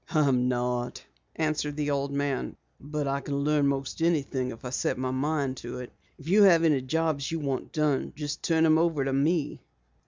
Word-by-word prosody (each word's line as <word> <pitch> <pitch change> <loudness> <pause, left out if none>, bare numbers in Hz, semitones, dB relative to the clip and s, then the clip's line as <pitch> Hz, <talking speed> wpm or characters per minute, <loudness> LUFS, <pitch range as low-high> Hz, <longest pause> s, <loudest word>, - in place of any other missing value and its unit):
"I'm 135 -6 +2
not," 125 -1 -2 0.3
answered 155 -2 -1
the 145 -1 0
old 140 0 -1
man, 140 -1 -2 0.2
"but 150 0 -3
I 140 +1 -1
can 140 +1 -3
learn 145 -1 +2
most 140 +2 -2
anything 140 -6 0
if 115 +1 -9
I 125 - -4
set 125 - -1
my 130 0 -2
mind 135 0 -1
to 120 0 -7
it. 125 -1 -8 0.2
If 140 - -13
you 200 +5 +5
have 175 -5 +6
any 150 -5 +3
jobs 150 +1 -1
you 165 - -1
want 140 -4 -3
done 150 -4 0
just 150 -1 -4
turn 160 -1 +2
them 160 0 +5
over 165 -5 +1
to 135 - -1
me." 150 +3 0
145 Hz, 195 wpm, -27 LUFS, 135-155 Hz, 0.3 s, have